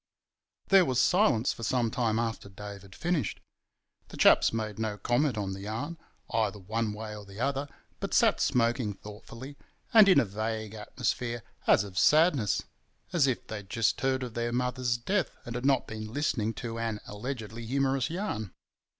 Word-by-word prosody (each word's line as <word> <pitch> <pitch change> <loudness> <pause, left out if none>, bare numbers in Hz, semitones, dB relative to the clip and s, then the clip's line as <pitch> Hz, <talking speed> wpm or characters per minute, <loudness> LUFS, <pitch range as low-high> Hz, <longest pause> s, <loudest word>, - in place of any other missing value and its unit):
There 195 -1 +7
was 130 -6 0
silence 140 - +3
for - - -11
some 115 0 +1
time 115 -3 0
after 115 -3 -2
Dave 100 0 -9
had 95 0 -14
finished. 175 -3 -1 0.7
The - - -11
chaps - - +6
made 110 -2 -3
no 110 -2 -2
comment 120 +2 +1
on 100 -2 -2
the 95 - -7
yarn, 115 +11 -5 0.3
either 110 -2 0
one 110 +3 -2
way 105 0 -6
or 105 - -9
the 100 +1 -12
other, 140 +2 -1 0.3
but - - -2
sat - - +4
smoking 115 -3 +1
thoughtfully, 115 +7 -10 0.4
and 215 -3 +8
in 185 - +7
a - - +3
vague 110 +1 -3
atmosphere 120 +1 -3 0.2
as - - +5
of 95 -3 -4
sadness—as 150 - +2
if 130 - -1
they'd 105 -3 -7
just 115 +1 +1
heard 130 -1 +1
of 120 -3 -6
their 120 0 -1
mother's 125 0 0
death 190 +10 -1
and 120 - -5
had 125 +3 -1
not 135 -3 +3
been 110 -1 -7
listening 115 -5 -1
to 115 0 -5
an 115 -2 -2
allegedly 115 +1 -6
humorous 135 0 +1
yarn. 135 - -3
115 Hz, 170 wpm, -29 LUFS, 105-135 Hz, 0.7 s, and